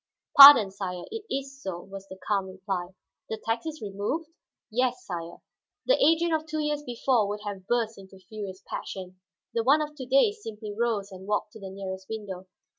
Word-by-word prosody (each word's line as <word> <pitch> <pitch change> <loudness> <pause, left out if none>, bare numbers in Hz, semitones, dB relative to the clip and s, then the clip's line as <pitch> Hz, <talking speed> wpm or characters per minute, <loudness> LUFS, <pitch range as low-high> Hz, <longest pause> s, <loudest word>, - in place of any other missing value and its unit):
"Pardon, 275 -8 +11
sire; 185 -2 -5
it 445 -1 -6
is 270 0 -4
so," 185 -6 -4
was 195 +1 -10
the 190 - -10
calm 200 -2 +1
reply. 185 -1 -5 0.3
"The 220 - -3
tax 225 +6 -3
is 310 -5 -6
removed?" 210 +11 -3 0.4
"Yes, 250 +1 0
sire." 170 -2 -7 0.4
The - - +3
Adrian 330 +2 +3
of 315 0 -1
two 310 0 -4
years 300 -1 -1
before 245 -4 +1
would 205 +1 -4
have 195 -2 -6
burst 230 -3 0
into 190 0 -14
furious 190 0 -8
passion; 185 -1 -7 0.3
the 230 - +1
one 280 +6 +5
of 300 0 -3
to 260 -3 -7
day 275 - +4
simply 220 - -8
rose 215 -3 -1
and 190 +1 -10
walked 210 0 -1
to 220 - -11
the 195 -2 -8
nearest 190 -1 -7
window. 195 -4 -6
210 Hz, 190 wpm, -27 LUFS, 190-270 Hz, 0.4 s, Pardon